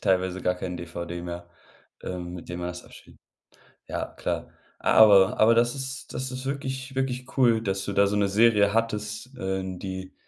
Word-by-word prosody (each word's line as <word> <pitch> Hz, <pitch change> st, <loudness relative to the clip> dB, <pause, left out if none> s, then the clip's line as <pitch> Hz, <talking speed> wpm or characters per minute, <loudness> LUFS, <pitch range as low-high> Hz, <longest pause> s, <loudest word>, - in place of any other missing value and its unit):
teilweise 95 Hz, 0 st, +1 dB
gar 90 Hz, 0 st, +1 dB
kein 90 Hz, -1 st, -4 dB
DVD 85 Hz, 0 st, -6 dB
mehr, 85 Hz, 0 st, -6 dB, 0.6 s
ähm, 90 Hz, -1 st, -5 dB
mit 85 Hz, -, -9 dB
dem 90 Hz, 0 st, -5 dB
man 90 Hz, -, -3 dB
das 90 Hz, 0 st, -7 dB
abspielt. -, -, -16 dB, 0.7 s
Ja, -, -, -3 dB
klar. -, -, -4 dB, 0.3 s
Aber 100 Hz, -3 st, +6 dB
aber 115 Hz, +2 st, +6 dB
das 120 Hz, +3 st, +3 dB
ist 135 Hz, -1 st, -6 dB
das 130 Hz, +1 st, -3 dB
ist 130 Hz, +1 st, -6 dB
wirklich 130 Hz, -1 st, -4 dB
wirklich 130 Hz, -1 st, -3 dB
cool, 120 Hz, -4 st, +4 dB
dass 95 Hz, -2 st, -2 dB
du 100 Hz, -, -3 dB
da 100 Hz, +1 st, +4 dB
so 105 Hz, +1 st, 0 dB
'ne 100 Hz, -1 st, +2 dB
Serie 105 Hz, -1 st, +4 dB
hattest, 110 Hz, +2 st, -2 dB
äh, 95 Hz, -4 st, -2 dB
n 95 Hz, -1 st, -5 dB
die 95 Hz, -1 st, -6 dB
100 Hz, 185 wpm, -26 LUFS, 90-120 Hz, 0.7 s, Aber